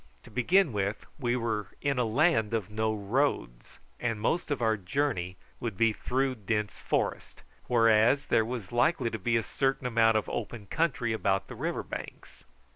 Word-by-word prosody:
To - - -15
begin 160 +4 +3
with, 100 0 -2
we 120 -3 0
were 110 -4 -2
in 140 -2 0
a 125 - +2
land 115 -2 +2
of 105 -2 -3
no 110 +1 0
roads, 105 - -1 0.2
and 115 -3 -1
most 160 +12 0
of 145 - -1
our 110 -2 +2
journey 95 -3 -2 0.2
would 110 -5 -4
be 115 +1 +3
through 130 +4 0
dense 105 -3 -2
forest, - - -2 0.2
whereas 115 +4 +4
there 110 - +3
was 115 -4 -5
likely 120 0 +2
to 110 - -4
be 115 +4 +1
a 115 - 0
certain 135 +2 -1
amount 115 -2 +4
of 110 - -2
open 110 -4 -5
country 130 - 0
about 95 -3 0
the - - -7
river - - -2
banks. - - -9
115 Hz, 175 wpm, -29 LUFS, 105-130 Hz, 0.2 s, whereas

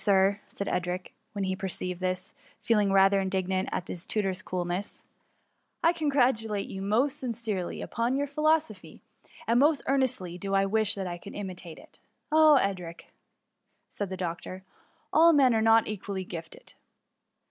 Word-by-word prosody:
Sir," 200 0 +3
said 200 - -5
Edric, 180 +1 -3 0.2
when 200 -2 -3
he 190 0 -1
perceived 185 -1 -2
this» 185 0 -2 0.3
feeling 210 -3 +2
rather 195 0 +5
indignant 190 -1 -1
at 180 - -3
his 175 - -5
tutor's 190 -3 -1
coolness 180 +2 -4 0.3
— - - -44
" - - -47
I 335 - +5
congratulate 245 - +1
you 190 - -6
most 230 +8 +1
sincerely 225 -7 -3
upon 235 +4 -1
your 285 - 0
philosophy, 310 +2 -1 0.4
and 235 +1 +3
most 290 0 +3
ear 275 +1 +3
nestly 190 -10 -2
do 195 0 -2
I 195 0 +3
wish 215 +1 +1
that 195 -1 -4
I 175 -1 -5
could 200 - -10
imitate 185 -4 -7
it." - - -17 0.2
" - - -49
Ah, 310 -1 +7
Edric 180 -6 -3 0.4
!" - - -49
returned 205 -2 -4
the 190 - -4
doctor, 180 +1 -5 0.2
" - - -39
all 335 +1 +7
men 265 -5 +5
are 220 - +2
not 225 0 +5
equally 200 -2 -4
gifted." 170 -3 -9
200 Hz, 170 wpm, -28 LUFS, 185-235 Hz, 0.4 s, Ah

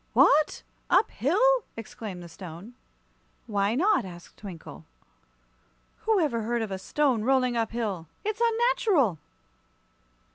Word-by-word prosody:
"What! 300 +1 +4 0.3
Up 440 - +4
hill?" 465 - +3
exclaimed 210 -5 -7
the - - -9
Stone. 180 +5 -10 0.7
"Why 205 -1 0
not?" 385 +8 +3
asked 175 -2 -11
Twinkle. 165 - -10 1.2
"Who 440 -3 +4
ever 270 -9 0
heard 235 +1 -1
of 215 - -5
a 190 - -3
stone 255 +2 +1
rolling 255 -1 +2
up 225 -2 0
hill? 205 -8 -3 0.2
It's 430 +2 -2
unnatural!" 450 - +2
235 Hz, 120 wpm, -27 LUFS, -, 1.2 s, What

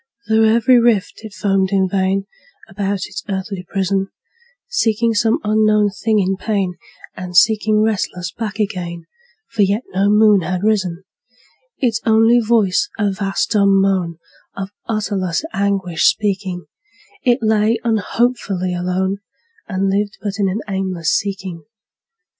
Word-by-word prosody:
Through 220 0 +4
every 235 +2 +5
rift 230 -3 +1
it 220 - -8
foamed 195 0 0
in 190 -1 +2
vain, 195 +1 0 0.4
About 195 -1 -2
its - - -7
earthly 190 -1 -4
prison, 195 0 -1 0.6
Seeking 230 - +1
some 225 +1 +2
unknown 210 -1 +3
thing 215 +2 0
in 195 -1 +1
pain, 200 -4 -1 0.4
And 180 -1 -4
sinking 215 +1 +4
restless 180 -5 -2
back 210 +1 -5
again, 180 -5 -3 0.5
For 220 - 0
yet 200 +4 +2
no 195 +2 +2
moon 210 -1 +5
had 180 +2 -3
risen: 195 -5 0 0.7
Its 230 -4 0
only 225 +2 +4
voice 225 - +2
a 205 -2 +1
vast 195 0 -2
dumb 200 -3 +4
moan, 185 -4 0 0.4
Of 195 0 -5 0.2
utterless 205 - -1
anguish 195 -4 0
speaking, 190 -4 -1 0.6
It 245 -2 +3
lay 220 +1 +2
unhopefully 220 -4 0
alone, 185 +2 -1 0.5
And 195 -1 0
lived 205 +1 -1
but 205 -1 -4
in 195 -1 +2
an 200 +4 -2
aimless 190 -4 -2
seeking. 190 -4 -3
200 Hz, 135 wpm, -18 LUFS, 190-220 Hz, 0.7 s, every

